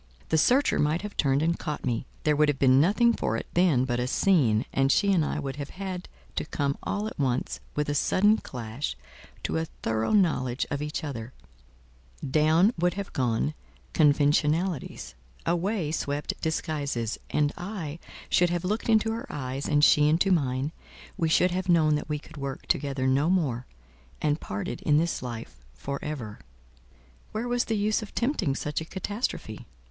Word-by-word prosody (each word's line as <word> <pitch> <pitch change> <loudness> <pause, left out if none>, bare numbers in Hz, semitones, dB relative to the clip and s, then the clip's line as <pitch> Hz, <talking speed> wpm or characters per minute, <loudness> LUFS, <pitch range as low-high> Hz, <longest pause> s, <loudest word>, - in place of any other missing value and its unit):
The 160 - +3
searcher 260 - +3
might 150 +5 +1
have 210 - -6
turned 140 0 +2
and 170 +1 +1
caught 150 -2 -4
me; 120 0 -1 0.2
there 150 -1 +3
would 150 0 +4
have 145 - 0
been 130 0 +5
nothing 225 +8 +4
for 115 - -1
it - - -5
then 165 -8 +3
but 120 -2 -1
a 125 - 0
scene, 130 - +3
and 135 0 +3
she 200 +4 +3
and 170 -4 +3
I - - -2
would 140 -2 -4
have 145 -1 -5
had 185 -2 -6 0.3
to - - +1
come 140 -2 -1
all 205 +1 -2
at 220 - -6
once, 130 -2 0 0.2
with 150 0 0
a 145 - 0
sudden 205 +8 +3
clash, 120 - -5 0.5
to - - -1
a 160 - -1 0.2
thorough 110 - 0
knowledge 140 - +2
of 145 0 -2
each 150 +2 -3
other: 125 -5 -5 0.9
down 160 - +4
would 175 +1 +2
have 200 -1 -5
gone 125 +3 0 0.4
conventionalities, 150 - +2 0.3
away 175 -1 0
swept 145 -2 -2
disguises, 145 -7 -2
and 150 -1 +1
I 175 -5 -5 0.3
should 175 0 +3
have 175 +1 -2
looked 215 +5 -1
into 225 0 +4
her 230 +5 -5
eyes, 135 -1 -4
and 150 0 +3
she 150 -1 +6
into 175 +5 +3
mine—we 145 +2 -2
should 180 +3 +4
have 185 +1 -2
known 160 -3 +5
that 150 - -2
we 150 - 0
could 150 - -13
work 140 -1 -5
together 135 -2 0
no 135 +5 +3
more, 140 -10 0 0.5
and 150 +1 0
parted 100 +4 -4
in 150 -1 +3
this 170 +2 0
life 115 - -7
for 140 - -4
ever. 130 -9 -5 0.9
Where 225 +3 -2
was 245 0 +1
the 225 - -1
use 210 +2 +1
of 215 - -9
tempting 230 - 0
such 150 +2 -2
a - - -5
catastrophe? 190 - -4
150 Hz, 175 wpm, -27 LUFS, 135-180 Hz, 0.9 s, she